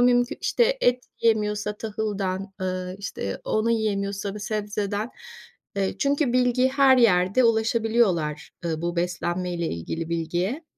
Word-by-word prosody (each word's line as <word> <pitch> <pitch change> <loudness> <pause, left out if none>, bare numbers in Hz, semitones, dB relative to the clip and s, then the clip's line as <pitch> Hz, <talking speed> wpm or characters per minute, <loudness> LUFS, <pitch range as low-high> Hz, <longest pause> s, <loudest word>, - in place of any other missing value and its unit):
mümkü 245 0 +3
işte, - - +2
et 245 0 +2 0.2
yiyemiyorsa 210 -2 +1
tahıldan, 200 -3 -3
ııı, 185 0 -3
işte, 145 - -4
onu 215 +2 +1
yiyemiyorsa 200 -3 -1
bir 210 - -7
sebzeden. 210 +1 -2 0.7
Eee, 195 -1 0
çünkü 280 -2 +1
bilgi 250 0 +3
her 270 -1 +5
yerde 200 +1 +4
ulaşabiliyorlar, 220 -8 +1
eee, 160 -1 -2
bu 175 0 -2
beslenmeyle 175 0 -1
ilgili 160 - -4
bilgiye. 175 - -2
210 Hz, 120 wpm, -25 LUFS, 180-235 Hz, 0.7 s, her